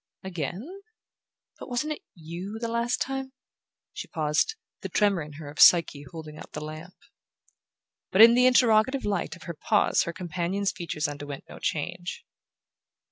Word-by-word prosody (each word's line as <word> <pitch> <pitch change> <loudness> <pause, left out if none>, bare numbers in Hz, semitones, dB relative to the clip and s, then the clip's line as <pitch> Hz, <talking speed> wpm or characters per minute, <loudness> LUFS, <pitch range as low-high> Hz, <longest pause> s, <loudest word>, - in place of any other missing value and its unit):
"'Again'? 190 - -5 0.8
But - - -9
wasn't 275 +5 -1
it 305 - -11
YOU, 175 +5 -7
the 230 +1 -3
last 235 +1 0
time 270 -1 -5 0.3
?" - - -65
She - - -6
paused, 155 - 0 0.3
the - - -5
tremor 200 -4 +2
in 150 0 -8
her 150 0 -9
of 145 - -10
Psyche 150 -5 +6
holding 155 -2 -9
up - - -12
the 150 0 -5
lamp. 155 +4 -9 1.2
But 200 +4 +8
in 230 +1 +9
the 250 +1 +5
interrogative 250 +1 +4
light 200 -4 -1
of 180 - -14
her 170 - -5
pause 205 +6 +2
her 170 - -3
companion's 185 +3 -2
features 170 -5 -3
underwent 145 -1 -7
no - - -11
change. 175 +3 -3
180 Hz, 160 wpm, -27 LUFS, 155-230 Hz, 1.2 s, in